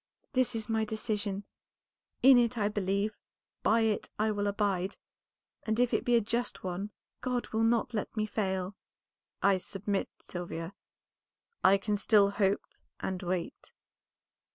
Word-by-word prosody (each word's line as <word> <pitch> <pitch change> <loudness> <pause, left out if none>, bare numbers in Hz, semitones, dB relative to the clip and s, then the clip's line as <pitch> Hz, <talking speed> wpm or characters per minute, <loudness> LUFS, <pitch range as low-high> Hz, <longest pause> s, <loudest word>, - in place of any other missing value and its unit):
This 255 -3 +2
is 220 -2 -2
my 220 -1 +1
decision; 210 -2 -2 0.8
in 260 -1 +9
it 240 0 +1
I 205 -2 +2
believe, 205 +1 0 0.5
by 225 +1 +4
it 220 -2 0
I 215 +1 +2
will 205 -1 -1
abide, 200 -2 0 0.6
and 220 +1 -1
if 245 -1 +3
it - - +2
be 245 - +4
a 230 - +5
just 235 +3 -2
one 185 +3 -3 0.3
God 250 -1 -1
will 220 - 0
not 230 +1 +2
let 215 +1 -3
me 215 - +2
fail." 190 -2 -2 0.7
"I 195 -1 +5
submit, 195 +1 -2
Sylvia; 175 0 -6 0.9
I 195 +1 +7
can 205 +1 -1
still 200 -1 +4
hope 200 -1 +1 0.3
and 185 -1 -3
wait." 180 -2 -4
210 Hz, 145 wpm, -31 LUFS, 195-225 Hz, 0.9 s, in